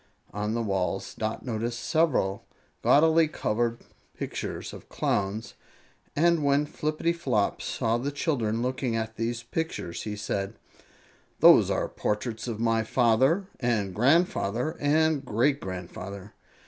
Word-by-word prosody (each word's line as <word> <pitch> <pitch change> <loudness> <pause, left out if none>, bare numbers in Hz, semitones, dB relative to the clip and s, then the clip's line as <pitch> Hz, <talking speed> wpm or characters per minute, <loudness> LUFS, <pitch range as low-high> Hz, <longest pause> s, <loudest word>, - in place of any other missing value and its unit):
On 105 +2 -2
the 115 - 0
walls 95 -4 -1
Dot 110 +2 -4
noticed 120 0 -2
several 150 - +1 0.3
gaudily 160 +2 +5
colored 120 -4 -1 0.4
pictures - - -5
of - - -11
Clowns, 100 +2 -1 0.6
and 170 0 +3
when 140 +1 +3
Flippityflop 155 -7 -1
saw 115 +1 0
the 135 +4 -2
children 120 -7 -1
looking 130 -2 -1
at 110 0 -3
these 115 +1 -2
pictures 160 - -4
he 105 -1 -4
said: 100 -1 -3 0.8
"Those - - +7
are - - 0
portraits 110 +3 -3
of 115 -3 -4
my 115 -1 +2
father 130 - +3
and 110 -6 0
grandfather 140 - +2
and 155 0 +2
great 135 +4 +1
grandfather. 95 +2 -7
120 Hz, 120 wpm, -27 LUFS, 105-145 Hz, 0.8 s, Those